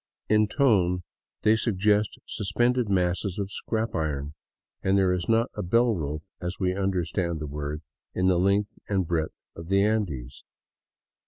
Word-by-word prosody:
In 105 0 +4
tone 95 -9 +2 0.4
they 110 +1 +5
suggest 105 -1 +1
suspended 120 +4 +1
masses 90 0 0
of 100 -1 -3
scrap 110 +1 -2
iron, 75 -2 -2 0.5
and 95 +1 +2
there 95 -2 +3
is 90 +2 -2
not 115 +1 +3
a - - -3
bell 115 +6 +3
rope, 75 -4 -3 0.2
as 90 +1 -3
we 90 -1 +1
understand 90 -3 -1
the 75 - -4
word, 75 +1 -5 0.3
in 90 - +1
the 90 -2 +4
length 100 +3 +1
and 95 -3 +1
breadth 80 -1 -2
of 85 0 -9
the 100 +1 +3
Andes. 85 - -1
95 Hz, 155 wpm, -26 LUFS, 85-105 Hz, 0.5 s, they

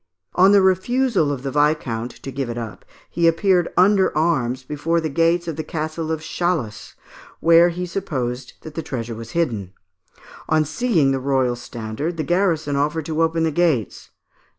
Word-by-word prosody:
On 190 +2 +5
the 200 -1 +6
refusal 190 - +2
of 135 -2 -4
the 135 - -3
viscount 145 -6 0
to 135 - -5
give 135 -1 -3
it 120 - -4
up 115 -3 -7 0.2
he 170 -1 +1
appeared 175 +1 +2
under 190 -3 +4
arms 135 -6 0
before 150 +5 -1
the 160 -1 -2
gates 170 +3 +2
of 160 -2 -4
the 155 - -3
Castle 155 0 -4
of 160 -1 -2
Chalus, 155 -10 -3 0.4
where 170 +1 +6
he 180 +1 -4
supposed 130 -9 -4
that 155 - -10
the 165 - -3
treasure 120 -6 -5
was 115 0 -9
hidden. 110 - -1 0.8
On 155 -1 +3
seeing 160 - +1
the 135 - 0
royal 130 -2 +1
standard, 120 +7 -5
the 155 - -1
garrison 165 -5 +1
offered 150 +2 0
to 160 +1 -1
open 165 0 +1
the 160 - +1
gates. 155 - 0
155 Hz, 175 wpm, -21 LUFS, 130-170 Hz, 0.8 s, the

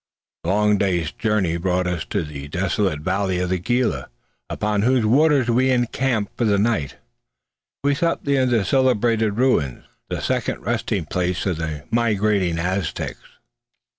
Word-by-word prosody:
A - - -6
long 105 +2 +3
day's 90 -5 0
journey 100 -5 0
brought 90 +1 0
us 90 -2 -2
to - - -2
the 70 -2 -7
desolate 90 0 -1
valley 95 +2 0
of 90 0 -1
the 95 - +1
Gila, 115 - 0 0.4
upon 105 -1 -1
whose 125 0 +2
waters 140 +2 +4
we 125 +3 +3
encamped 120 -3 0
for - - -1
the 105 -2 +3
night. 100 - 0 0.9
We 140 0 +3
slept 170 +3 -1
near 140 -2 +2
the 115 -5 +1
celebrated 115 -5 +2
ruins, 115 - +1 0.3
the - - -3
second - - -2
resting 110 -5 -1
place 90 +3 -2
of 90 -5 0
the 80 -3 -4
migrating 105 -6 +1
Aztecs. 90 +1 -3
105 Hz, 150 wpm, -22 LUFS, 90-120 Hz, 0.9 s, waters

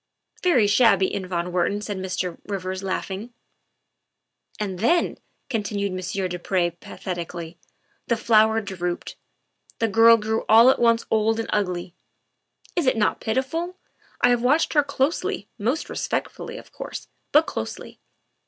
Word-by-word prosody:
" - - -31
Very 280 - +4
shabby 205 -3 +4
in 190 -2 -3
von 175 -1 -2
Wertman," 185 +4 0
said 205 -2 -4
Mr. 185 -2 -3
Rivers, 190 -2 -3
laughing. 195 +4 -4 0.4
' - - -54
' - - -30
And 195 -4 -3
then, 335 - +2
' - - -45
' - - -49
continued 205 -3 -1
Monsieur 185 +1 -2
du 180 0 -5
Pre 175 -1 0
pathetically, 170 -1 -7 0.2
" - - -42
the 235 - +1
flower 220 -1 +4
drooped; 180 -3 -4 0.6
the 225 - +1
girl 225 +2 +7
grew 220 +1 -1
all 230 +4 +8
at - - -1
once 230 -1 +3
old 220 +1 +2
and 225 - -3
ugly. 180 -4 -1 0.8
Is 345 -6 +1
it 255 - +3
not 210 - +1
pitiful? 325 +10 -2 0.4
I - - +5
have 245 -1 +3
watched 290 +7 +2
her 295 - +5
closely 285 +2 -1
most 245 +9 -1
respectfully, 470 +1 -4
of - - -13
course, - - -7 0.2
but 305 +2 +5
closely. - - -6
210 Hz, 160 wpm, -24 LUFS, 185-235 Hz, 0.8 s, all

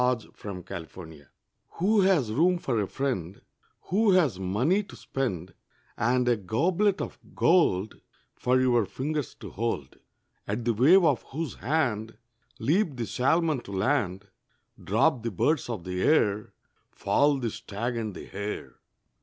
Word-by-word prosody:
A 125 0 +3 0.2
FRIEND 95 -4 -8
IN 90 -1 -7
NEED 70 -3 -16 0.5
Who 205 +4 +2
has 175 - +3
room 175 +7 +3
for 120 -9 -1
a 100 - -2
friend 100 -10 -3 0.5
Who 205 +1 +4
has 150 - +3
money 120 - +1
to 205 - -12
spend, 95 -10 -4 0.4
And 125 +2 +1
a 120 - +4
goblet 170 - +1
of - - -5 0.2
gold 110 - +2 0.3
For 125 +1 +1
your 120 -5 +3
fingers 145 +7 -3
to - - -10
hold, 105 - -3 0.5
At 110 +3 -3
the 120 - +2
wave 165 - +6
of 145 -6 +3
whose 155 -4 -4
hand 115 -5 -1 0.4
Leap 155 - +1
the 120 -2 -3
salmon 155 +5 +1
to 100 - -10
land, 100 -3 0 0.6
Drop 125 +6 +2
the 115 - -2
birds 130 - 0
of 110 -7 -4
the 90 +1 -3
air, 105 -8 +2 0.4
Fall 140 +8 +2
the 120 -4 -2
stag 115 +6 -4
and 110 -4 -3
the - - -8
hare. 105 +1 -6
120 Hz, 150 wpm, -27 LUFS, 100-155 Hz, 0.6 s, wave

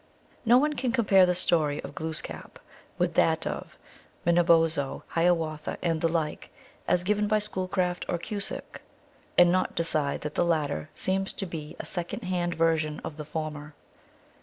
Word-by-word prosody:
No 235 +2 +7
one 300 +3 +2
can 260 -4 -1
compare 200 -7 +5
the 180 - +2
story 155 -5 +2
of - - -8
Glooskap 160 0 -5 0.4
with - - +1
that - - +2
of - - -5 0.5
Manobozho 165 -4 +3
Hiawatha 165 -3 0
and 165 -2 0
the 165 - +2
like, 160 -2 -2 0.4
as 175 - +2
given 210 +2 +1
by 215 +1 +3
Schoolcraft 185 -3 -2
or 175 - +1
Cusick, 200 +4 -3 0.6
and 175 0 +7
not 185 +1 0
decide 155 -4 0
that 150 0 -4
the - - +2
latter 150 - -1
seems 195 +1 0
to 195 - -4
be 155 -4 -7
a - - -6
second 175 -2 -3
hand 175 -2 -1
version 160 -2 +1
of 150 - -6
the 150 - -6
former. 150 -1 -5
170 Hz, 160 wpm, -27 LUFS, 155-185 Hz, 0.6 s, No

